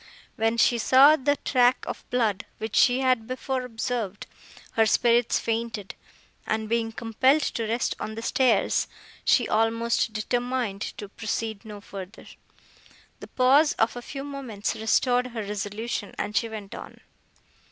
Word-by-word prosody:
When 225 +1 0
she 235 +1 +3
saw 270 +6 +7
the 285 0 +1
track 250 -1 +3
of - - -5
blood, 220 -5 0
which 220 0 -5
she 250 +1 +4
had 255 -4 +1
before 255 +1 -3
observed, 230 -4 -4 0.5
her 225 -1 +3
spirits 235 +1 +3
fainted, 225 -3 -3 0.5
and, 220 0 -1
being 225 0 0
compelled 260 +7 +2
to 230 -4 -2
rest 230 +2 -1
on 220 - -5
the 225 - -6
stairs, 235 -5 +2 0.4
she 240 - +3
almost 230 +1 +1
determined 240 -1 -2 0.2
to 205 - -7
proceed 220 0 -4
no 210 -2 -9
further. 195 +1 -9 0.9
The - - -10
pause 275 +4 +4
of 225 +2 0
a 245 - -6
few 275 +2 -7
moments 265 -8 -4
restored 245 +3 +2
her 235 -3 -5
resolution, 205 +2 -4
and 210 - -4
she 230 - +1
went 210 -3 -8
on. - - -10
230 Hz, 145 wpm, -26 LUFS, 220-250 Hz, 0.9 s, saw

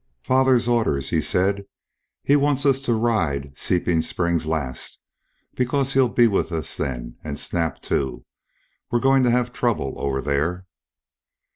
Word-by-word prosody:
"Father's 130 -2 +3
orders," 110 - +1
he 80 - +2
said. 100 +5 0 0.6
"He 145 - +4
wants 145 -1 +2
us 135 -1 +3
to 125 -3 0
ride 80 -12 0
Seeping 85 0 0
Springs 85 -1 -1
last 75 -6 -3 0.6
because 135 +2 0
he'll 130 -2 +4
be 120 +1 +4
with 100 -4 +1
us 80 -4 -4
then, - - -4
and 70 -2 -5
Snap 85 -2 -2
too. 65 -1 -2 0.6
We're 120 - +1
going 135 +1 +4
to 125 - +3
have 120 0 +1
trouble 110 - -1
over 70 -1 -1
there." 75 +7 -1
95 Hz, 145 wpm, -23 LUFS, 75-125 Hz, 0.6 s, He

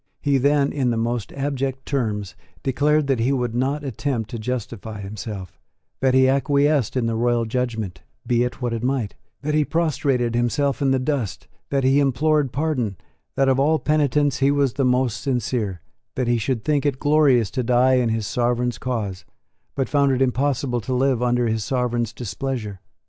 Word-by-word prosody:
He 140 -2 +2
then, 140 +1 +2
in 135 -4 +1
the 115 - 0
most 115 -1 -2
abject 135 -1 -2
terms, 105 -8 -2 0.3
declared 150 +3 +2
that 135 -3 +1
he 120 +4 +2
would 125 -4 -1
not 135 +5 -1
attempt 130 -3 -3
to 120 - -4
justify 110 -2 -5
himself, 100 -2 -7 0.4
that 130 -1 +2
he 130 0 +5
acquiesced 140 -1 +2
in 125 - +1
the 115 - 0
royal 120 0 +1
judgment, 110 -5 -3 0.2
be 120 -1 +2
it 125 +1 -4
what 120 -1 0
it 115 - -3
might, 125 -4 -1 0.3
that 150 +1 -1
he 155 0 +3
prostrated 140 -7 0
himself 120 +2 0
in 140 - +2
the 135 - +3
dust, 130 -5 -2 0.2
that 140 -1 0
he 135 +2 +4
implored 145 +1 +2
pardon, 130 - -1 0.4
that 135 - +2
of 135 0 +3
all 155 +3 +3
penitents 145 -2 +1
he 135 +1 +3
was 140 -3 +2
the 140 - 0
most 125 -2 +1
sincere, 120 - -2 0.3
that 130 -2 -1
he 120 -1 +2
should 115 0 -2
think 150 -2 +2
it 145 -3 0
glorious 145 -6 +3
to 130 - -1
die 125 +2 +3
in 125 -2 +2
his 110 -1 -1
Sovereign's 120 +1 0
cause, 105 -7 -3 0.5
but 135 -2 0
found 140 -2 +2
it 130 - +1
impossible 130 -1 0
to 125 +4 -2
live 130 -1 +2
under 120 -1 +2
his 110 -1 -1
Sovereign's 120 -1 -1
displeasure. 115 -3 -4
125 Hz, 180 wpm, -22 LUFS, 115-140 Hz, 0.5 s, he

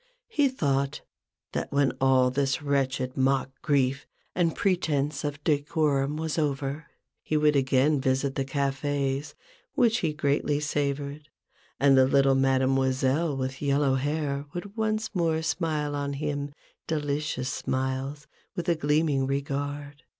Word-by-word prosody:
He 290 -11 +3
thought, 140 - -1 0.5
that - - -3
when 140 -1 +3
all 130 -1 +4
this 140 +1 0
wretched 135 -2 0
mock 135 0 +1
grief 140 -1 +1 0.3
and 170 -3 +1
pretence 150 -7 0
of 145 0 -4
decorum 145 -1 +1
was 160 0 -2
over, 145 0 -2 0.3
he 155 - -1
would 150 0 +3
again 135 +1 +3
visit 135 +1 +1
the 135 - -1
cafes 140 +1 -1 0.4
which 235 -1 +3
he 160 - 0
greatly 145 0 0
savoured, 145 0 -2 0.5
and 140 0 +5
the 130 0 +6
little 135 0 +4
Mademoiselle 135 +2 +2
with 130 0 -4
yellow 140 -1 +2
hair 145 +1 -1
would 200 +4 -6
once 220 0 -1
more 165 -4 +1
smile 155 -3 -1
on 140 0 -2
him 145 0 -3 0.4
delicious 145 -4 -2
smiles, 130 +2 -2 0.3
with 175 - -4
a 170 - +3
gleaming 150 -2 +1
regard. 145 +1 -3
145 Hz, 130 wpm, -27 LUFS, 135-150 Hz, 0.5 s, the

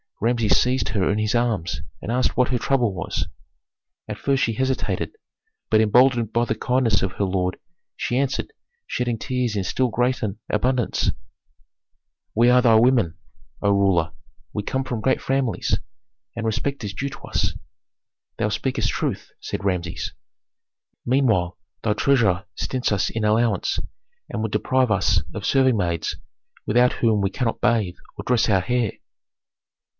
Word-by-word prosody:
Rameses 115 -1 +2
seized 125 +1 +1
her 100 -4 +1
in 105 - 0
his 110 0 0
arms, 105 - 0 0.2
and 115 - -4
asked 125 +1 +1
what 125 -1 +3
her 125 - +1
trouble 125 -6 +1
was. 90 - -3 0.8
At - - -6
first 135 -1 +1
she 115 - +1
hesitated, 130 - -1 0.5
but 110 - +5
emboldened 120 +1 +4
by 120 +1 +2
the - - 0
kindness 125 -5 +1
of 95 0 -1
her 100 - -1
lord, 90 -1 0 0.4
she 120 - -1
answered, 135 -1 -1 0.3
shedding 120 -2 -1
tears 125 -2 -1
in 100 - 0
still 125 +7 0
greater 120 -3 0
abundance, 125 +3 +1 1.2
"We 120 +2 +5
are 125 0 +6
thy 115 -3 +5
women, 115 -7 +4 0.5
O 100 - +4
ruler, 95 -3 +2 0.4
we 105 - -1
come 130 +6 -2
from 120 -4 -4
great 130 - +1
families, 135 -3 0 0.6
and 115 -1 -3
respect 130 +4 -2
is 100 -1 -4
due 140 +5 -3
to 140 - -10
us." - - -1 0.8
"Thou 105 - 0
speakest 110 +5 -1
truth," - - -3
said - - -5
Rameses. 90 -3 -2 0.9
"Meanwhile 115 -9 +2 0.3
thy 105 - +2
treasurer 110 -7 +2
stints 130 -3 -1
us 100 -2 +1
in 110 - -3
allowance, 110 +2 +2 0.5
and - - -3
would 110 -1 -2
deprive 130 +4 +2
us 100 - +3
of - - -5
serving 130 -3 +3
maids, 85 -4 -1 0.5
without 120 +3 +4
whom 110 -3 +2
we 95 0 0
cannot 115 +1 -2
bathe 105 -7 +1 0.2
or - - -5
dress 120 -2 +2
our 95 -3 +4
hair." 120 +2 0
115 Hz, 155 wpm, -23 LUFS, 100-125 Hz, 1.2 s, are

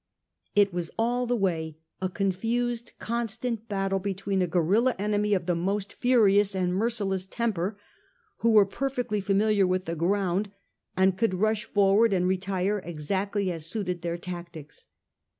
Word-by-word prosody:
It 200 -2 +4
was 175 -2 -3
all 245 +2 +1
the 245 - +1
way 165 -7 -1 0.2
a 185 - 0
confused 230 +5 -1
con 235 +1 -2
stant 230 0 -4
battle 195 -1 0
against 195 -1 -4 0.2
a 180 - +1
guerilla 190 +9 +2
enemy 210 +1 +1
of 180 -3 -2
the 180 - +1
most 195 +4 -2
furious 205 -5 +3
and 180 -1 0
merciless 195 -3 -1
temper, 205 -3 -2 0.6
who 230 - +2
were 215 -3 +6
perfectly 245 -1 -2
familiar 200 0 +2
with 185 0 0
the 165 - -3
ground, 190 +3 0 0.5
and 190 0 +3
could 225 -5 +2
rush 215 +2 +1
forward 200 +2 +3
and 180 -1 +2
retire 190 +2 0
exactly 190 +5 -2
as 165 -2 -5
suited 180 -2 -2
their 170 0 -2
tactics. 170 -4 -9
195 Hz, 150 wpm, -27 LUFS, 180-215 Hz, 0.6 s, were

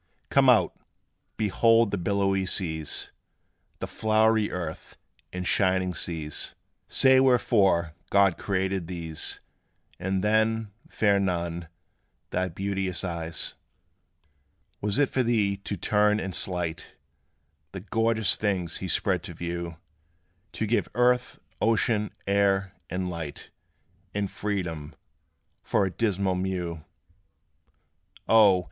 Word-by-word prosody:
Come - - +5
out! - - +4 0.6
behold 115 +1 +3
the 100 - 0
billowy 95 0 +1
seas, 80 -6 -1 0.7
The - - -4
flowery 110 0 +2
earth, 85 -3 -6 0.3
and 90 0 -4
shining 95 -1 +2
skies: 80 -4 -3 0.3
Say 130 0 +5
wherefore 105 -10 +3 0.2
God 100 -3 +4
created 95 -2 -1
these; 80 -3 -2 0.6
And 95 +1 -1
then, 110 0 +1 0.2
fair 100 -2 +2
Nun, 85 -3 -2 0.6
thy 95 0 0
beauteous 95 +1 -3
eyes. 85 -2 -2 1.3
Was 105 +2 -1
it 145 -1 +4
for 130 - 0
thee 110 -5 +1
to 100 0 -5
turn 105 +3 +2
and 95 -3 -4
slight 85 -2 -3 0.8
The 95 - -7
glorious 110 +1 +1
things 95 -5 -1
he 95 - -5
spread 95 0 +1
to 85 - -8
view 85 0 -5 0.8
To 110 - -2
give 115 +3 0
earth, 125 0 +2 0.2
ocean, 110 -1 +2 0.2
air, 100 -1 +2 0.2
and 90 +1 -2
light, 85 -4 -6 0.6
And 100 -1 -1
freedom, 90 -7 -4 0.7
for 100 - +1
a 95 - -2
dismal 100 -3 0
mew? 90 -3 -3 1.4
O! 105 -5 +6
95 Hz, 110 wpm, -27 LUFS, 85-105 Hz, 1.4 s, O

